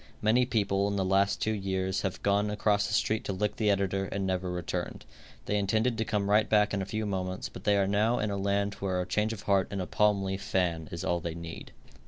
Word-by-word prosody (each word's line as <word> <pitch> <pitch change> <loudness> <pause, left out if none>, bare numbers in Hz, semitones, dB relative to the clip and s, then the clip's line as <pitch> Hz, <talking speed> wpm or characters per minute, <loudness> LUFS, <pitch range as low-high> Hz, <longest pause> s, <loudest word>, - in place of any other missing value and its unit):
Many 120 +4 +3
people 100 -4 +1
in 100 - -1
the 95 -1 0
last 95 +1 +2
two 110 - +1
years 95 -2 -1
have 95 -3 -4
gone 100 +1 +2
across 105 0 +1
the - - -4
street 110 0 +1
to 100 - -2
lick 105 +2 -2
the 105 -2 +2
editor 95 -1 +1
and 100 0 -3
never 95 -1 -1
returned. 90 -2 -4 0.4
They 105 - 0
intended 110 +4 +1
to 110 - +1
come 105 -2 -1
right 105 +1 +3
back 105 -1 +3
in 100 - 0
a 95 - -4
few 110 -1 -2
moments, 95 -1 -3
but - - -11
they 105 -1 +4
are 100 - +3
now 105 +5 +2
in 105 -1 -1
a - - -1
land 100 +1 0
where 95 -2 -1
a 90 - -1
change 105 +4 0
of 110 -3 -7
heart 100 -2 +2
and 100 - -4
a 90 - -2
palm 105 -1 +2
leaf 95 0 -3
fan 85 -6 -1
is 85 - -5
all 85 - 0
they 85 -1 -5
need. 85 -1 -8
100 Hz, 250 wpm, -29 LUFS, 95-105 Hz, 0.4 s, they